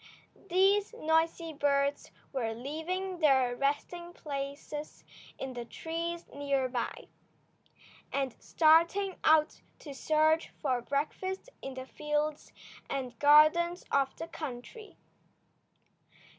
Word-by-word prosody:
These 390 +4 +3
noisy 325 0 +1
birds 280 -1 +1 0.2
were 230 -4 -2
leaving 340 +9 -4
their 265 -5 +4
resting 345 +6 -2
places 285 0 -6 0.3
in 265 -1 -5
the 240 -1 -5
trees 335 +5 -4
near 280 -2 0
by, 245 -1 -4 1.0
and 270 -3 -1
starting 335 +5 +3
out 310 0 +4 0.2
to 290 - -9
search 310 +3 +2
for 255 -5 0
breakfast 345 - -3
in 270 -1 -6
the 260 0 -6
fields 300 +1 -2 0.4
and 255 -4 -4
gardens 310 +4 +5
of 275 -1 +2
the 330 - -6
country. 310 - -8
300 Hz, 105 wpm, -31 LUFS, 275-335 Hz, 1.0 s, gardens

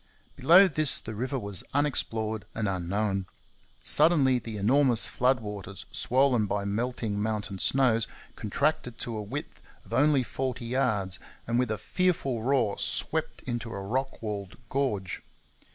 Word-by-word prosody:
Below 175 +9 +7
this 155 -5 +1
the 110 - -7
river 130 +6 -2
was 100 -6 -3
unexplored 110 -7 -1
and 110 -2 -1
unknown. 95 +1 -1 0.6
Suddenly 145 -5 +5
the 115 -2 -6
enormous 120 +3 +4
flood 125 0 +1
waters 100 -2 -6
swollen 125 -4 +2
by 100 0 -1
melting 110 0 -2
mountain 105 -3 -2
snows 120 -3 +2 0.3
contracted 125 +2 -1
to 115 - -4
a 105 - -3
width 105 - -6 0.2
of - - -10
only 145 -1 +4
forty 130 -1 -3
yards, 110 -7 0 0.3
and 120 +1 +1
with 125 -2 +1
a 110 - -1
fearful 135 - 0
roar 125 -4 +1
swept - - -1
into 120 -2 -3
a 100 - -5
rock 130 +7 -3
walled 100 -3 -5
gorge. 105 -10 -1
115 Hz, 140 wpm, -28 LUFS, 105-135 Hz, 0.6 s, Below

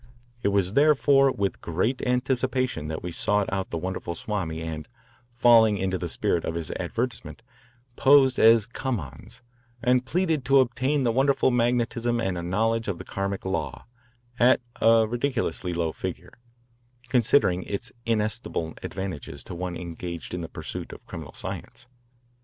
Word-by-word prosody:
It - - 0
was 100 -1 +1
therefore 140 -1 +5
with 100 -5 -2
great 95 +10 -1
anticipation 130 - 0
that 80 0 -5
we 90 - -4
sought 105 +3 0
out 95 -1 -2
the - - -3
wonderful 90 0 -4
Swami 85 -5 -3
and, 80 -1 -5 0.5
falling 115 -3 +6
into 95 -1 -1
the - - -3
spirit 85 - 0
of 80 - -3
his 85 -2 -4
advertisement, 115 -1 -4 0.5
posed 135 -2 +5
as 115 -1 +6
"come 120 0 -3
ons" 70 - -11 0.4
and 125 +1 +2
pleaded 160 +1 0
to 135 +1 +5
obtain 130 +3 +1
this 115 -2 +2
wonderful 135 +1 +3
magnetism 120 0 +1
and 95 -5 -1
a 85 - -3
knowledge 115 +6 0
of 100 -4 -2
the - - -8
Karmic 100 0 -3
law 95 - -3 0.5
at 125 +2 +5 0.2
a 115 0 +6
ridiculously 115 -7 -2
low 85 -2 -1
figure, - - -6 0.8
considering 115 -7 +3
its 100 +1 -5
inestimable 110 -7 -1
advantages 85 -7 -6
to - - -8
one 90 0 -4
engaged 85 -1 -6
in 90 - -3
the 80 - -6
pursuit - - -6
of - - -13
criminal - - -8
science. 120 - -7
110 Hz, 150 wpm, -26 LUFS, 90-125 Hz, 0.8 s, falling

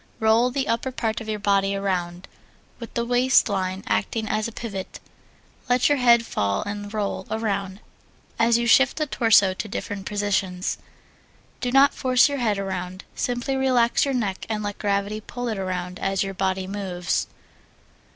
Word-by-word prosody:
Roll 225 +3 +4
the 265 +1 -2
upper 230 +3 -1
part 230 -2 -2
of 220 - -7
your 215 - -1
body 200 -1 +1
around, 180 -2 -2 0.5
with 235 - -8
the 235 - 0
waist 245 +2 +4
line 190 -1 -2
acting 105 - -1
as 215 +1 0
a - - -7
pivot. 205 -5 -6 0.7
Let 250 +2 +3
your 290 -1 +2
head 235 -2 +5
fall 100 - -1
and 205 0 -6
roll 210 -2 -3
around 200 -3 -2 0.6
as 230 0 +4
you 235 - 0
shift 270 +2 +4
the 305 - 0
torso 225 -8 +4
to 215 - -5
different 200 -1 -5
positions. 195 -3 -1 0.8
Do 250 - -2
not 270 +2 +5
force 255 +1 +4
your 285 -1 -3
head 215 -4 +1
around 185 -1 -4
simply 245 +2 -2
relax 255 -3 +3
your 275 -2 0
neck 200 -6 -2
and 215 -1 -2
let 205 -1 -4
gravity 200 +1 -1
pull 245 +3 -6
it 215 -3 -3
around 180 -1 -4
as 195 0 0
your 195 0 -4
body 190 0 -1
moves. 185 -3 -2
210 Hz, 170 wpm, -24 LUFS, 195-235 Hz, 0.8 s, head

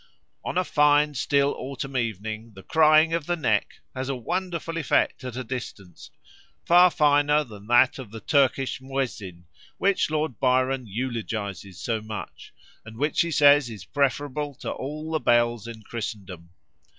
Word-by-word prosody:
On - - -3
a 185 - +3
fine 150 -2 +3
still 140 +1 +1
autumn 135 0 -6
evening 110 -1 -3
the 95 - -12
'crying 155 0 +4
of 165 -3 -2
the 175 - +1
neck' 110 -10 -1
has 130 +1 -4
a 135 - -1
wonderful 170 +4 -3
effect 150 -3 +1
at 125 -2 -6
a 130 - -4
distance, 110 -7 -8 0.6
far 180 +1 +7
finer 150 -1 +3
than 105 -5 -13
that 120 +3 +4
of 125 -5 -8
the 115 +2 -8
Turkish 135 -1 +1
muezzin, 120 -10 -4 0.3
which 195 -4 +1
Lord 155 -6 -2
Byron 130 -1 +1
eulogises 105 -4 -4
so 115 -2 -2
much, 110 -1 -8 0.3
and 110 0 -12
which 150 +4 +1
he 170 - 0
says 145 -4 +5
is 105 -4 -9
preferable 145 +1 -1
to - - -5
all 155 +4 -6
the 160 - 0
bells 120 -3 +2
of 115 -2 -9
Christendom. 100 -7 -7
130 Hz, 155 wpm, -25 LUFS, 110-150 Hz, 0.6 s, far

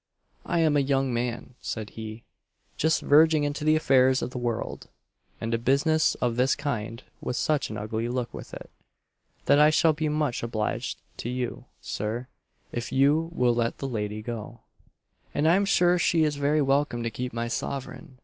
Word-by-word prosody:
"I 170 -1 +1
am 155 -2 +3
a - - +4
young 135 -2 +1
man," 120 +1 -3
said 110 -2 -5
he, 110 0 -8 0.5
"just 160 0 +1
verging 155 +1 +5
into 145 0 -2
the 155 0 +4
affairs 130 -4 +4
of 125 - -4
the 125 - -5
world; 120 -2 -3 0.5
and 115 +1 -3
a 115 - +1
business 145 +6 +2
of 120 -1 -1
this 130 +2 +3
kind 115 -5 -4 0.2
has 125 - -2
such 155 -2 0
an 110 - -5
ugly 110 +3 -3
look 125 -1 -3
with - - -9
it, - - -10 0.7
that 145 - +5
I 150 0 +7
shall 155 +1 +4
be 155 0 -1
much 150 -4 -1
obliged 110 -2 -2 0.2
to 120 - -4
you, 125 -1 -4 0.2
Sir, 110 +4 -3 0.5
if 120 0 -4
you 145 +5 +3
will 125 -7 +2
let 115 0 -1
the 135 - -4
lady 105 -3 -3
go, 115 0 -6 0.7
and 150 +2 +2
I 165 - +6
am 200 +1 +2
sure 180 -2 +3
she 165 -1 +3
is 150 -1 +1
very 145 +1 +2
welcome 135 -3 +1
to 115 - -2
keep 125 +2 -4
my 115 +1 -3
sovereign." 130 +3 -5
130 Hz, 185 wpm, -26 LUFS, 115-150 Hz, 0.7 s, I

